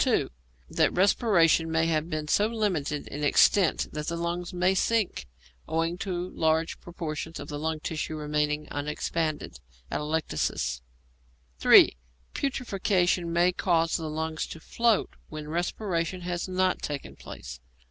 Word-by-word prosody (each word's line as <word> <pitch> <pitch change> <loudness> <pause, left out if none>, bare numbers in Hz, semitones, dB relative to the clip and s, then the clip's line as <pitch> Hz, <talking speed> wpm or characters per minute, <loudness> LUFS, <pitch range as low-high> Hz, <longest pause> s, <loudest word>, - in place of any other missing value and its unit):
(2) - - +1 0.4
That - - +2
respiration 175 -4 +3
may 160 0 +2
have 160 0 0
been 155 -1 -3
so 205 +7 +3
limited 185 -11 -1
in 145 +1 -5
extent 175 +4 +4
that 150 0 -5
the 170 - -2
lungs 170 +1 -3
may 180 +1 +2
sink, 205 - 0 0.4
owing 165 +1 0
to 180 -2 -3
large 160 +1 0
portions 165 -2 -5
of 145 +1 -7
lung 155 +2 -2
tissue 155 0 -3
remaining 150 0 -1
unexpanded 150 +2 -2 0.3
(atelectasis). 80 - -1 0.8
(3) - - +7 0.4
Putrefaction 190 -9 0
may 175 +2 +3
cause 165 -2 +1
the 160 -2 -2
lungs 160 +1 -3
to 165 - -8
float 230 +5 +1 0.2
when 155 -1 -7
respiration 175 +1 -2
has 175 0 -3
not 185 0 +1
taken 145 -1 -5
place. 65 +1 -9
165 Hz, 130 wpm, -27 LUFS, 155-180 Hz, 0.8 s, 3